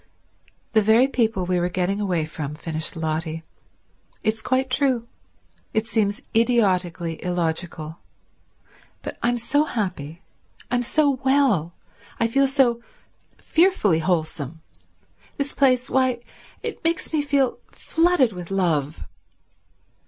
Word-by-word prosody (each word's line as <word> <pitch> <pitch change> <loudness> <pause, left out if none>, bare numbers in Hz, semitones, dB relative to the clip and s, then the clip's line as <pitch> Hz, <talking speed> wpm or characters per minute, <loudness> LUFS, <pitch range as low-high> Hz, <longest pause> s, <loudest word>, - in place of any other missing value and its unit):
"The 220 - +5
very 220 +5 +5
people 225 -8 0
we 180 0 +1
were 175 +1 0
getting 185 +3 -1
away 180 -6 0
from," 150 -1 -5
finished 160 +1 -4
Lotty. 160 0 -2 0.8
"It's 220 0 0
quite 260 +2 0
true. 255 -4 +1 0.7
It 220 0 +2
seems 210 -2 0
idiotically 185 -8 +1
illogical. 170 -2 -2 1.0
But - - -6
I'm 240 +1 +1
so 265 +6 +2
happy, 180 - -4 0.5
I'm 245 0 +2
so 280 +1 +2
well, 260 - +2 0.4
I 230 - +3
feel 275 +4 +3
so 260 -4 +2 0.6
fearfully 320 - +3
wholesome. 160 -3 -2 0.8
This 280 0 -2
place—why, 255 -2 +2 0.4
it - - -5
makes 330 0 -1
me 310 - +3
feel 280 -3 +1
flooded 325 - +2
with 180 -2 -8
love." 160 - 0
215 Hz, 115 wpm, -23 LUFS, 170-260 Hz, 1.0 s, The